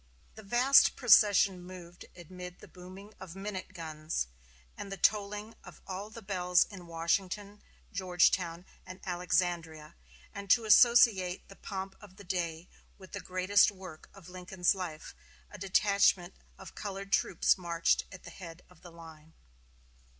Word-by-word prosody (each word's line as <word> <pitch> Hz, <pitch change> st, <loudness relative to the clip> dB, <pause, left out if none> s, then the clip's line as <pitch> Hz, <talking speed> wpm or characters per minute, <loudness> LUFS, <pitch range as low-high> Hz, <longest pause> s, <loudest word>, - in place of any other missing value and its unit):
The 220 Hz, -, -12 dB
vast 245 Hz, +6 st, +4 dB
procession 205 Hz, -6 st, +4 dB
moved 175 Hz, -1 st, -12 dB
amid 180 Hz, +1 st, -10 dB
the -, -, -15 dB
booming 185 Hz, +3 st, -13 dB
of 185 Hz, -2 st, -10 dB
minute 195 Hz, -1 st, -6 dB
guns, 155 Hz, -, -4 dB, 0.5 s
and 200 Hz, -, -8 dB
the 195 Hz, -, -5 dB
tolling 210 Hz, +2 st, 0 dB
of -, -, -13 dB
all 195 Hz, +2 st, -6 dB
the 230 Hz, +1 st, -11 dB
bells 180 Hz, -2 st, +2 dB
in 185 Hz, -4 st, -11 dB
Washington 190 Hz, +5 st, -2 dB, 0.3 s
Georgetown, 180 Hz, -2 st, +1 dB, 0.2 s
and 185 Hz, +1 st, -11 dB
Alexandria; 175 Hz, -3 st, -2 dB, 0.4 s
and 200 Hz, -1 st, -8 dB
to 230 Hz, +2 st, +4 dB
associate 215 Hz, -5 st, +5 dB
the 195 Hz, -, -13 dB
pomp 195 Hz, -1 st, -7 dB
of 200 Hz, -3 st, -15 dB
the 200 Hz, -, -13 dB
day 170 Hz, -2 st, -4 dB, 0.3 s
with 190 Hz, -1 st, -15 dB
the 200 Hz, -, -5 dB
greatest 185 Hz, +2 st, +3 dB
work 185 Hz, -5 st, -12 dB
of 195 Hz, -4 st, -16 dB
Lincoln's 180 Hz, 0 st, -1 dB
life, 175 Hz, -5 st, -7 dB, 0.4 s
a 205 Hz, -, -11 dB
detachment 195 Hz, -1 st, +2 dB, 0.2 s
of 190 Hz, -3 st, -12 dB
colored 195 Hz, -1 st, -7 dB
troops -, -, +2 dB
marched 170 Hz, -2 st, 0 dB
at 185 Hz, -, -12 dB
the 170 Hz, -, -11 dB
head 170 Hz, -1 st, -11 dB
of 180 Hz, -, -21 dB
the 175 Hz, -, -13 dB
line. 160 Hz, -1 st, -15 dB
185 Hz, 145 wpm, -30 LUFS, 175-200 Hz, 0.5 s, associate